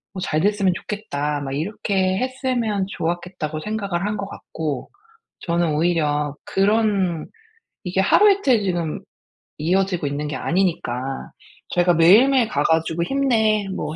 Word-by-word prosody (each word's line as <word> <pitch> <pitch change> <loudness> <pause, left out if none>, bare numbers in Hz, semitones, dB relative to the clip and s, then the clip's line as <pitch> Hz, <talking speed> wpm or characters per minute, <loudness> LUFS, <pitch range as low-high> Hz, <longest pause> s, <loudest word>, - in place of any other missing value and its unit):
뭐 185 - -4
잘 155 -4 0
됐으면 200 -1 +2
좋겠다." 150 -9 -3
막 135 -1 -4
이렇게 190 +3 -1
했으면 250 -6 -1
좋았겠다고 170 -3 -3
생각을 200 -4 -2
한 210 +1 -1
것 200 -1 -4
같고 155 -8 -5 0.5
저는 170 -2 0
오히려 150 -3 0
그런 195 -4 +1 0.6
이게 185 +2 +1
하루이틀 380 - +4
지금 175 -5 -2 0.6
이어지고 180 0 0
있는 145 +1 -3
게 145 - -4
아니니까 135 -8 -2 0.4
저희가 175 0 +3
매일매일 230 +10 +5
가 145 - 0
가지고 160 +1 +1
"힘내, 220 -4 +1
뭐 155 - -4
180 Hz, 290 characters per minute, -22 LUFS, 155-210 Hz, 0.6 s, 매일매일